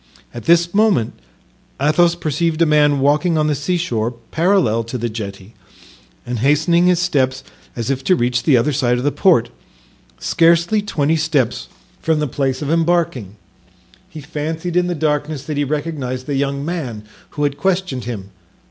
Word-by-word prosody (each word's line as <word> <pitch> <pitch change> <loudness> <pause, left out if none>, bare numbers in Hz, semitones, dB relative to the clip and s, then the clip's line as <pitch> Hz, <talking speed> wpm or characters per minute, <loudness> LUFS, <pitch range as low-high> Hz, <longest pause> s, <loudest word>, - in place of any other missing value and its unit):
At 120 - -8
this 170 +1 +3
moment 200 - +2 0.7
Athos 165 +4 +3
perceived 160 0 -1
a - - +4
man 150 -2 +3
walking 150 +4 +2
on 155 - +2
the 150 - +1
seashore 145 -7 -1 0.2
parallel 155 - +2
to 115 +3 -5
the 120 0 -2
jetty, 100 -1 -7 0.7
and 120 -1 -3
hastening 155 +7 +3
his 180 -1 +4
steps, 135 -7 0 0.3
as 120 +2 -2
if 135 -1 -3
to 185 - +4
reach 120 -4 0
the 140 -6 +4
other 140 +5 +1
side 125 -3 +1
of 125 - -3
the 145 - +1
port, 120 -12 +3 0.7
scarcely 170 - +2
twenty 160 -6 0
steps 150 -6 0 0.3
from 160 -1 +1
the 150 - 0
place 135 0 -2
of 145 - -2
embarking. 165 - 0 0.7
He 155 - -9
fancied 160 +3 -4
in 180 0 +2
the 175 - -2
darkness 150 -1 -1
that 150 0 -5
he 145 - +1
recognized 140 -3 -3
the 145 - -3
young 140 +1 -1
man 135 -11 -4 0.3
who 145 - 0
had 145 -1 0
questioned 185 -7 -1
him. 100 -5 -6
150 Hz, 165 wpm, -18 LUFS, 130-170 Hz, 0.7 s, a